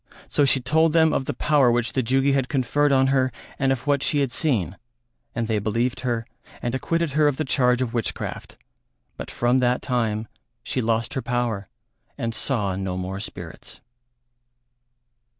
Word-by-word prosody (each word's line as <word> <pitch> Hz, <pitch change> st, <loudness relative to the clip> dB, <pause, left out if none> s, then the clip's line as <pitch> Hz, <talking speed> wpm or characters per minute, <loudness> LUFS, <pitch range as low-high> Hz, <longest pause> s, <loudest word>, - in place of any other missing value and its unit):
So 145 Hz, -, +2 dB
she 135 Hz, 0 st, +4 dB
told 155 Hz, +5 st, +2 dB
them 160 Hz, -1 st, +4 dB
of 135 Hz, -, 0 dB
the -, -, -2 dB
power 145 Hz, -5 st, +3 dB
which 120 Hz, 0 st, 0 dB
the 130 Hz, -, +1 dB
Jugi 135 Hz, +3 st, +2 dB
had 135 Hz, -2 st, +1 dB
conferred 145 Hz, +2 st, +1 dB
on 135 Hz, -1 st, +4 dB
her 130 Hz, -1 st, +2 dB, 0.3 s
and 135 Hz, -1 st, +2 dB
of 130 Hz, 0 st, -2 dB
what 145 Hz, -2 st, +2 dB
she 145 Hz, -, +1 dB
had 135 Hz, -3 st, 0 dB
seen, 110 Hz, -, 0 dB, 0.6 s
and 115 Hz, -1 st, -1 dB
they 110 Hz, -2 st, +1 dB
believed 115 Hz, +4 st, -1 dB
her 120 Hz, -3 st, -2 dB, 0.3 s
and 120 Hz, -, -3 dB
acquitted 165 Hz, +4 st, 0 dB
her 150 Hz, +2 st, +3 dB
of 145 Hz, -2 st, 0 dB
the 155 Hz, -, -1 dB
charge 125 Hz, -2 st, +2 dB
of 115 Hz, -, -5 dB
witchcraft; 115 Hz, -3 st, -4 dB, 0.6 s
but -, -, -7 dB
from 120 Hz, +2 st, +2 dB
that 125 Hz, 0 st, +1 dB
time 115 Hz, -4 st, -1 dB, 0.4 s
she 130 Hz, -, -1 dB
lost 115 Hz, +1 st, 0 dB
her 130 Hz, -, -2 dB
power 120 Hz, -6 st, -2 dB, 0.5 s
and 115 Hz, 0 st, -2 dB
saw 105 Hz, -8 st, -1 dB
no 95 Hz, -1 st, -3 dB
more 95 Hz, +1 st, -4 dB
spirits. 100 Hz, -, -8 dB
125 Hz, 175 wpm, -24 LUFS, 115-140 Hz, 0.6 s, she